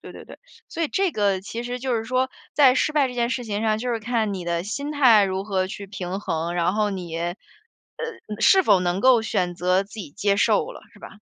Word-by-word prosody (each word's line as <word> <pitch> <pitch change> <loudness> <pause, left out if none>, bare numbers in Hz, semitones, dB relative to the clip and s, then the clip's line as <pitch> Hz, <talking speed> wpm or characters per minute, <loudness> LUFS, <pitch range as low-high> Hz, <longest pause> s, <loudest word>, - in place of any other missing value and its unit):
对 - - -11
对 - - -11
对， - - -13 0.3
所 335 - -4
以 320 - 0
这 385 +1 +1
个， 200 -6 0
其 230 +5 -6
实 245 +1 -4
就 255 0 -2
是 225 - -3
说， 255 +2 0 0.2
在 265 -4 +5
失 305 - +1
败 290 -3 +2
这 250 - -8
件 240 -1 0
事 255 - -2
情 210 -2 -3
上， 215 -1 +1
就 250 +2 -3
是 230 - -1
看 220 -2 -1
你 185 -2 -6
的 170 0 -1
心 280 +9 -4
态 240 -8 +6
如 190 0 -2
何 195 -2 -1
去 200 +1 -8
平 190 -1 -5
衡。 165 -2 -3
然 175 +2 +1
后 215 -1 +1
你 175 -4 -5
呃， 175 +2 -3 1.0
是 380 - +5
否 205 - +4
能 180 +1 -1
够 250 -1 +5
选 180 -5 -1
择 180 +2 +1
自 200 - -18
己 200 -10 -7
接 200 +4 0
受 470 - +2
了， - - -12
是 - - -18
吧？ - - -10
210 Hz, 260 characters per minute, -23 LUFS, 185-250 Hz, 1.0 s, 态